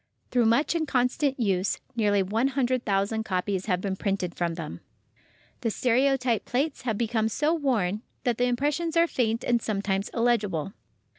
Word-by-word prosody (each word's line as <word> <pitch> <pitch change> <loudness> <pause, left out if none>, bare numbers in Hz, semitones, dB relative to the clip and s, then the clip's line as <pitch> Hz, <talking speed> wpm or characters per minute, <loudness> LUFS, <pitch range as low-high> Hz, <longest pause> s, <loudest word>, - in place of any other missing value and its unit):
Through 245 -2 +3
much 255 +9 +3
and 325 -2 -1
constant 260 +2 +1
use—nearly 205 0 +1
100,000 225 -2 0
copies 190 -1 -2
having 180 -3 +1
been 195 -1 -2
printed 190 -3 -2
from 170 -1 -2
them—the 160 - -9
stereotype 250 +1 +2
plates 280 +5 -1
have 225 -4 -2
become 225 -1 0
so 300 +8 +1
worn 220 - 0 0.2
that 240 -2 0
the 245 - +3
impressions 295 +7 0
are 335 - +6
faint 230 -6 -1
and 240 -1 +2
sometimes 200 -2 -1
illegible. 205 -8 0
230 Hz, 140 wpm, -27 LUFS, 200-255 Hz, 0.2 s, are